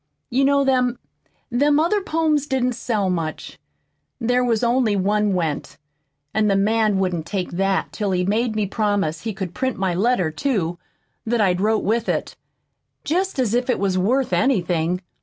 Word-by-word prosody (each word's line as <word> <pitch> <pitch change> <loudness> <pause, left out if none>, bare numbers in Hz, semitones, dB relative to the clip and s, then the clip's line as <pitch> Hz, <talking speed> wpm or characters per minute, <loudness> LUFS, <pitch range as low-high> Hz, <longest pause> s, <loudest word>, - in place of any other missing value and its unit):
"You 260 +3 +2
know, 280 0 +3
them 250 -2 +1 0.5
them 290 +4 +3
other 400 +6 +2
poems 310 -5 0
didn't 255 -2 0
sell 215 -4 -1
much 165 -4 -4 0.6
there 245 +1 +1
was 235 -2 +1
only 235 -3 +2
one 205 +1 +1
went, 160 -5 -3 0.6
an' 215 -1 +2
the 200 - +3
man 215 +1 +2
wouldn't 180 -4 -1
take 190 -3 -3
that 195 +2 0
till 210 -2 -2
he'd 180 -1 0
made 220 +2 0
me 215 -1 +1
promise 200 -6 -1
he 220 -1 -4
could 185 -3 -5
print 260 -1 -2
my 190 -2 0
letter, 190 -3 +1
too, 175 - -1 0.5
that 235 +1 +1
I'd 185 -3 +2
wrote 215 +1 +1
with 230 +2 0
it - - -2 0.7
jest 370 +4 -1
as 245 -5 +1
if 245 +1 +1
that 255 - +1
was 195 -1 0
worth 245 +8 +1
anything! 180 -8 +1
215 Hz, 170 wpm, -22 LUFS, 190-250 Hz, 0.7 s, know